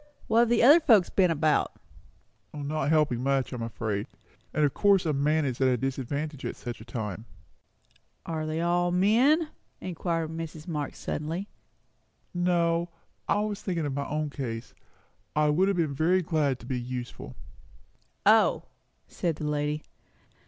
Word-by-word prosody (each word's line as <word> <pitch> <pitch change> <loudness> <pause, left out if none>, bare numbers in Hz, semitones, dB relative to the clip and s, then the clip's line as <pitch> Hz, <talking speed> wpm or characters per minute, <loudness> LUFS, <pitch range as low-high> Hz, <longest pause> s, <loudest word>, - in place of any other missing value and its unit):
"What 225 +1 +3
have 235 -1 +4
the 240 - +3
other 290 +7 +9
folks 220 - +4
been 185 -2 +3
about?" 155 -1 +1 0.8
"Not 145 -1 -2
helping 150 -6 +2
much, 135 -1 0
I - - -3
am 120 - -5
afraid. 110 -3 -3 0.4
And 150 0 +2
of 140 - 0
course 200 -3 +3
a 155 - +1
man 150 +2 +2
is 130 -1 -3
at 130 - +5
a 125 -1 +2
disadvantage 135 +3 -3
at - - -3
such 120 -1 -7
a - - -11
time." 110 -2 -5 1.0
"Are 155 -1 -3
they 155 +1 -2
all 175 +1 +2
men?" 240 - +3 0.3
inquired 165 -2 -2
Mrs. 160 -1 -7
Marx 150 -4 -4
suddenly. 165 +7 -4 0.8
"No 175 -1 +1 0.4
I 205 - +2
was 210 -1 -3
thinking 170 -5 -2
of 145 - -2
my 140 +1 -3
own 150 0 -2
case. 120 -5 -5 0.6
I 150 0 +3
would 180 +6 +3
have 200 -2 +1
been 160 -4 0
very 175 +6 +2
glad 150 -5 0
to - - -11
be 130 -2 -2
useful." 120 - -6 0.9
"O!" - - +5 0.4
said 170 -3 -2
the 150 - -5
lady. 150 0 -1
155 Hz, 160 wpm, -28 LUFS, 140-175 Hz, 1.0 s, other